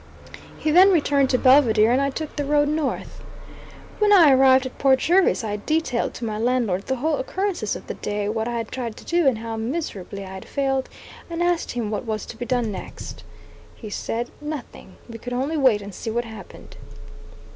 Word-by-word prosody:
He 310 - -1
then 370 +5 +7
returned 285 -5 +2
to 255 - +3
Belvidere, 240 -5 +5
and 260 - +2
I 275 - +1
took 305 +2 -6
the 290 - -1
road 290 +1 +2
north. 300 -1 -3 0.8
When 420 -1 +3
I 340 -8 +7
arrived 260 0 +5
at 260 - -8
Port 270 -1 +4
Jervis 350 -1 +2
I 210 -1 -2
detailed 305 +1 -1
to 240 - -5
my 215 -1 -3
landlord 230 -5 0
the 265 - 0
whole 295 +4 0
occurrences 360 - -2
of - - -9
the - - -5
day 205 0 -3
what 220 +1 -2
I 240 -1 -2
had 230 -1 -4
tried 235 -4 -5
to - - -12
do, 340 -3 +2
and 255 -4 +3
how 225 0 -5
miserably 220 - -4
I 190 - -9
had 190 - -9
failed, 270 -2 -1 0.4
and 335 +1 -2
asked 350 -1 0
him 230 -3 -3
what 215 - -3
was 215 -1 -3
to - - -9
be 240 +2 -6
done 245 -4 0
next. 190 - -8 0.5
He 215 -3 -9
said 235 +3 -3
"nothing;" 295 -10 -8
we 230 -1 -9
could 245 +2 -6
only 270 +6 -1
wait 255 -8 +3
and 200 0 -9
see 225 - -5
what 235 +2 -1
happened. 220 -3 -12
255 Hz, 205 wpm, -23 LUFS, 220-295 Hz, 0.8 s, then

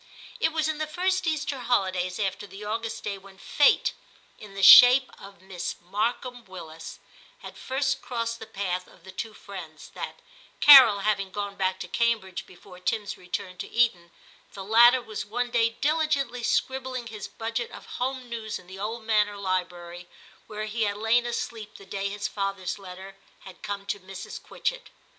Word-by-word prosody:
It 320 - +2
was 315 -1 0
in 310 -1 -2
the 310 - -2
first 370 +3 0
Easter 295 -3 -1
holidays 185 -7 0
after 200 0 -2
the 195 +2 -10
August 225 +1 -4
day 200 -1 -4
when 195 0 -16
Fate, 285 +8 +3 0.5
in 205 -2 -12
the 195 - -3
shape 250 +6 +9
oi 200 0 -11
Miss 190 -2 -5
Markham 235 +6 -3
Willis, 165 -3 -10 0.5
had - - -9
first 270 +1 -1
crossed 230 -1 -3
the 220 - -9
path 185 -2 -3
of - - -20
the 190 - -11
two 215 +3 -6
friends, 175 -7 -10
that, - - -7 0.4
Carol 260 -8 +9
having 195 -2 0
gone 200 +1 -5
back 190 -1 -1
to - - -5
Cambridge 225 -6 -1
before 180 0 -15
Tim's 210 +1 -2
return 180 0 -6
to - - -6
Eton, 210 -8 +1 0.4
the 195 - -7
latter 240 +4 +6
was 215 -2 -5
one 240 +4 -3
day 230 -1 +3
diligently 280 -1 0
scribbling 260 0 -1
his 215 -3 -7
budget 230 +1 -4
of - - -11
home 255 0 -4
news 225 -2 -5
in - - -16
the 190 +2 -11
old 220 +3 -4
manor 210 -2 +1
library 180 -2 -4 0.4
where 215 0 -5
he 220 +2 -4
had 205 -1 0
lain 230 +3 +2
asleep 225 -2 -5
the 195 - -14
day 195 +1 -3
his 205 +1 -3
father's 195 -1 -3
letter 190 +1 -10 0.2
had 190 - -13
come 200 -1 -5
to 200 +1 -3
Mrs. 190 +1 -9
Quitchett. - - -4
210 Hz, 175 wpm, -26 LUFS, 190-240 Hz, 0.5 s, shape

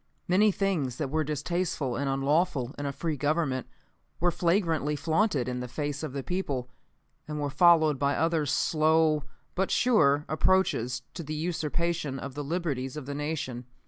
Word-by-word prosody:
"Many 200 +4 +4
things 180 -11 -1
that 140 -4 -3
were 155 0 +1
distasteful 150 -2 -2
and 140 +3 -1
unlawful 135 -1 +1
in 145 - -2
a - - -1
free 160 +2 -2
government 145 -2 0 0.5
were 175 +1 +3
flagrantly 170 -4 +1
flaunted 155 - +1
in 125 0 -2
the 125 - -4
face 145 +2 -3
of 155 -3 -4
the 140 -1 -4
people, 140 -9 -3 0.6
and 150 0 -4
were 145 -1 -2
followed 155 -2 +5
by 140 +1 +1
other 160 -1 +1
slow, 155 +1 +3 0.3
but 190 +1 0
sure, 155 - +3
approaches 155 -7 +1
to - - -6
the 155 -1 -5
usurpation 165 -2 -2
of 135 0 -6
the 145 +2 -4
liberties 145 -4 -2
of 150 - -6
the 140 - -5
Nation. 140 -5 -4
150 Hz, 165 wpm, -28 LUFS, 140-170 Hz, 0.6 s, followed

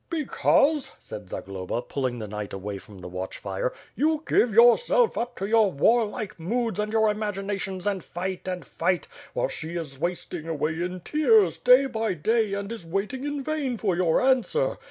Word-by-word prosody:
"Because," 300 -2 +2
said 105 -3 -9
Zagloba, 95 +6 -4
pulling 130 -1 -2
the 110 -2 -5
knight 105 0 -6
away 100 +1 -5
from 100 0 -14
the 90 - -7
watch 90 +1 -5
fire, 95 +5 -2 0.2
"you 310 +3 +1
give 240 - +3
yourself 245 - +5
up 240 - -3
to 195 - -3
your 215 -1 +4
warlike 215 - +1
moods 225 +4 -1
and 210 0 -1
your 220 0 +3
imaginations 195 -3 -3
and 200 -3 -1
fight 185 +2 -5
and 180 -5 -4
fight; 180 +4 -1 0.3
while - - 0
she 165 - -6
is 150 -6 -5
wasting 170 -1 -3
away 160 +1 -1
in 180 +1 -3
tears 225 - +3
day 250 +2 +6
by 225 -6 -1
day 220 +5 +1
and 200 +1 -4
is 230 -6 -6
waiting 195 +10 -3
in 290 -1 -3
vain 285 -5 -2
for 195 -5 0
your 170 -2 +2
answer. 265 - +1
200 Hz, 175 wpm, -26 LUFS, 160-240 Hz, 0.3 s, day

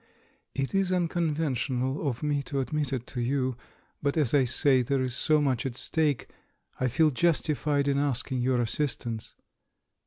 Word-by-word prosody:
"It 135 -1 -2
is 195 -1 +2
unconventional 150 -6 0
of 125 +2 -5
me 145 -1 +1
to 140 - -1
admit 145 +1 -1
it 125 -3 -2
to 125 - -4
you; 130 0 0 0.5
but, 140 +2 0
as 145 -7 +2
I 140 -3 +5
say, 130 +2 +3
there 135 +3 0
is 130 -1 -2
so 155 -1 +3
much 135 -4 +1
at 130 -4 -3
stake 145 0 0 0.3
— - - -36
I 130 - +3
feel 155 +6 +3
justified 150 -2 +1
in 140 0 +2
asking 130 -2 -1
your 125 0 +2
assistance. 120 -2 -3
140 Hz, 165 wpm, -28 LUFS, 125-150 Hz, 0.5 s, I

